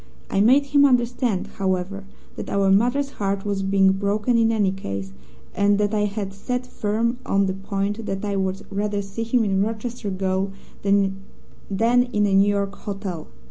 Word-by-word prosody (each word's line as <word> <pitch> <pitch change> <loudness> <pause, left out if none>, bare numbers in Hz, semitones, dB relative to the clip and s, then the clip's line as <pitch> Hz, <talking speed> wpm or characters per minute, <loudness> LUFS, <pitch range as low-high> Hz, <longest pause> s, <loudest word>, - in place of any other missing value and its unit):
I 195 - +2
made 260 +6 +5
him 285 0 +4
understand, 245 -5 +2
however, 190 +1 -3 0.3
that - - -6
our 195 -1 +2
mother's 245 +8 +2
heart 195 -4 -2
was 200 -1 -1
being 195 0 +4
broken 205 +5 0
in 225 -1 +4
any 205 -4 +2
case, 100 - -5 0.4
and 200 0 +3
that 205 0 0
I 210 -1 +2
had 200 -1 -4
set 250 +5 -3
firm 235 +1 -1
on 195 0 +2
the 190 - -1
point 200 +2 -3
that 195 +1 -3
I 200 -1 -1
would 190 0 -2
rather 205 0 -1
see 195 +3 -6
him 230 +1 +2
in 195 -2 +1
Rochester 225 +1 -3
gaol 190 0 -1 0.3
than 195 -1 +1 0.6
in 240 -2 +3
a 200 - +1
New 195 +1 +5
York 200 -1 0
hotel. 195 -5 -5
200 Hz, 175 wpm, -23 LUFS, 195-225 Hz, 0.6 s, made